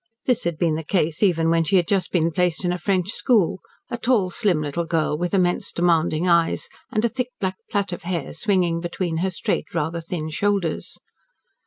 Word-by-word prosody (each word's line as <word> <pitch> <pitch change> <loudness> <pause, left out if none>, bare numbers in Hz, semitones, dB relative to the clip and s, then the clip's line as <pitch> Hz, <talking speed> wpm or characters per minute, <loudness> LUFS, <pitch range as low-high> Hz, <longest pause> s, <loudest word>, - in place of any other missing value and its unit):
This 250 -2 +1
had 170 -2 -1
been 165 -1 +1
the 160 +1 -3
case 160 -2 0
even 165 -5 +3
when 165 0 +3
she 185 +5 +1
had 175 -3 +3
just 195 -2 0
been 165 -2 +2
placed 180 +2 0
in 175 - +2
a 180 - -4
French 185 +1 0
school, 215 -8 +2 0.3
a 240 - -3
tall, 220 -7 +2
slim 190 -6 +1
little 155 +3 -2
girl, 160 -2 +1
with 175 +3 -2
immense 180 -3 +1
demanding 170 -1 +2
eyes, 170 -1 +2 0.2
and 215 +1 +1
a - - +5
thick 250 +1 -3
black 190 -1 -2
plait 200 -2 -1
of 175 - -5
hair 170 -4 -3
swinging 175 -2 +1
between 175 -1 -2
her 185 +3 0
straight, 180 - -3
rather 165 +1 -1
thin, 160 -2 -4
shoulders. 195 -1 -1
175 Hz, 200 wpm, -23 LUFS, 165-195 Hz, 0.3 s, a